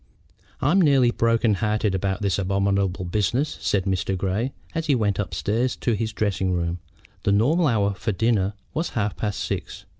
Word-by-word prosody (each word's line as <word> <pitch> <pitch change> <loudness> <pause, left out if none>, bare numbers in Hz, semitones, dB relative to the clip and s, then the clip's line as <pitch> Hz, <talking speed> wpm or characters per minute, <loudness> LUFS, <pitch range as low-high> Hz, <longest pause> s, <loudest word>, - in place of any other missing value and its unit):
"I'm 185 +6 +4
nearly 135 -6 +4
broken 115 -1 +2
hearted 105 0 0
about 95 +2 -1
this 100 0 +1
abominable 100 -1 0
business," 105 - 0
said 100 -2 +1
Mr. 95 0 -1
Grey, 100 +7 -1 0.2
as 165 -1 -2
he 145 - +4
went 105 -4 0
upstairs 105 +7 -1
to 120 - -1
his 110 +1 -1
dressing 100 -3 -1
room. 85 0 -1 0.4
The 100 - +1
normal 145 - +3
hour 100 -5 +2
for 100 +4 -2
dinner 105 -1 +1 0.2
was 160 +3 -1
half 105 -2 0
past 105 -2 -3
six. - - -4
105 Hz, 170 wpm, -24 LUFS, 95-120 Hz, 0.4 s, I'm